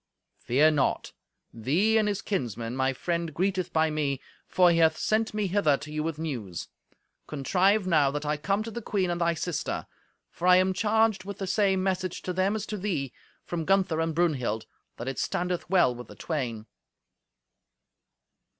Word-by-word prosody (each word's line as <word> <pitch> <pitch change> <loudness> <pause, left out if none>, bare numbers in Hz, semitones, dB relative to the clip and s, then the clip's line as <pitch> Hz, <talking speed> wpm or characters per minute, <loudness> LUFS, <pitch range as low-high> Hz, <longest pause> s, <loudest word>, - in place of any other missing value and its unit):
"Fear 145 +6 +4
naught. 140 -4 0 0.4
Thee 160 - +1
and 215 - +1
his 205 -1 -2
kinsmen 120 - -3
my 130 0 +1
friend 170 +4 -2
greeteth 185 0 0
by 160 0 +2
me, 145 -3 -1 0.3
for 180 -1 +4
he 165 - +2
hath 160 -1 +4
sent 220 +1 +1
me 210 -1 -1
hither 180 -7 +2
to 150 +2 -9
you 155 - -1
with 160 0 -3
news. 120 - -5 0.6
Contrive 185 +8 +2
now 155 -6 +4
that 145 +2 -4
I 150 +1 +1
come 195 +8 -1
to 225 - -6
the 235 - -5
queen 190 -4 0
and 175 0 -2
thy 170 0 +2
sister. 165 0 -3 0.5
For 180 - -3
I 180 - +8
am 185 +1 +3
charged 220 0 +2
with 200 +1 -7
the 195 - -3
same 190 0 +2
message 185 -1 -2
to 180 - -3
them 190 +3 +1
as 215 -1 -3
to 210 - -4
thee, 170 -10 -2 0.3
from 170 -2 -3
Gunther 185 -2 +2
and 165 -1 -1
Brunhild: 130 -10 0 0.3
that 120 - -6
it 135 - -3
standeth 180 -1 -2
well 175 -9 +4
with 120 0 -9
the - - -12
twain." 120 -9 -3
170 Hz, 180 wpm, -27 LUFS, 145-195 Hz, 0.6 s, I